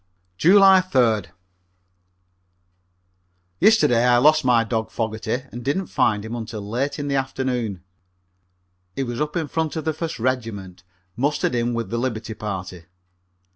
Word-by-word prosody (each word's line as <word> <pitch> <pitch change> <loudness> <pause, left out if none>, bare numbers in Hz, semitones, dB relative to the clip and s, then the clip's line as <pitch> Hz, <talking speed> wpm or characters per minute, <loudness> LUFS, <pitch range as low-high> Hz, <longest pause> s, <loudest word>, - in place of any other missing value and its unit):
July 190 - +6
3d. 120 - +1 2.3
Yesterday 125 - +4
I 125 0 +4
lost 155 +4 +4
my 120 -3 +4
dog 110 -1 -2
Fogerty 110 +2 -3
and 120 +1 -8
didn't 145 +9 -1
find 105 0 +1
him 110 - -6
until 110 -3 -6
late 130 +7 -2
in 145 -1 -4
the 140 - -1
afternoon. 125 -7 -2 1.1
He 135 - -1
was 120 +1 -4
up 150 +2 -2
in 165 -3 -1
front 160 -1 -2
of 160 - -4
the 160 - 0
First 165 +1 -5
Regiment, 110 -7 -3 0.3
mustered 140 +2 0
in 120 0 0
with 115 -4 -4
the 115 - -1
liberty 115 -3 -3
party. 95 -5 -6
120 Hz, 140 wpm, -22 LUFS, 110-145 Hz, 2.3 s, July